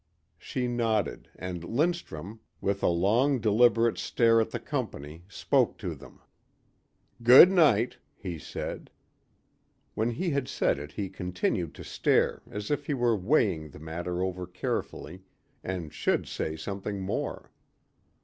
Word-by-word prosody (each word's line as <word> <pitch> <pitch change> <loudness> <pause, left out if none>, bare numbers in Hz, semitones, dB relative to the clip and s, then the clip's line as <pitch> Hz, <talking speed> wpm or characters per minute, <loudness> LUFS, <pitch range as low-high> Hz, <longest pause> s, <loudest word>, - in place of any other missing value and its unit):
She 125 -1 -3
nodded 115 -5 -1
and 90 -1 -6
Lindstrum, 115 - -2 0.2
with 100 0 -1
a - - +2
long, 110 +11 +3
deliberate 115 +1 +3
stare 115 -1 +3
at 110 - -1
the - - -4
company 75 +4 -5
spoke 100 - +1
to - - -4
them. - - -15 1.0
"Good 125 +10 +9
night," 140 - +3 0.2
he 90 -5 -6
said. 65 - -6 1.0
When 110 +2 0
he 165 +9 -2
had 140 -2 -1
said - - 0
it 75 +1 -9
he 100 -2 -3
continued 90 -3 -2
to - - -9
stare - - +1
as 105 +3 -5
if 145 -1 -1
he 145 - 0
were 120 -3 +2
weighing 95 - +1
the 75 - -13
matter 85 +3 -4
over 90 -1 -3
carefully 90 0 -4 0.4
and 90 -5 -5
should - - 0
say 80 - -3
something 100 +4 -5
more. 95 - -4
100 Hz, 140 wpm, -28 LUFS, 90-120 Hz, 1.0 s, Good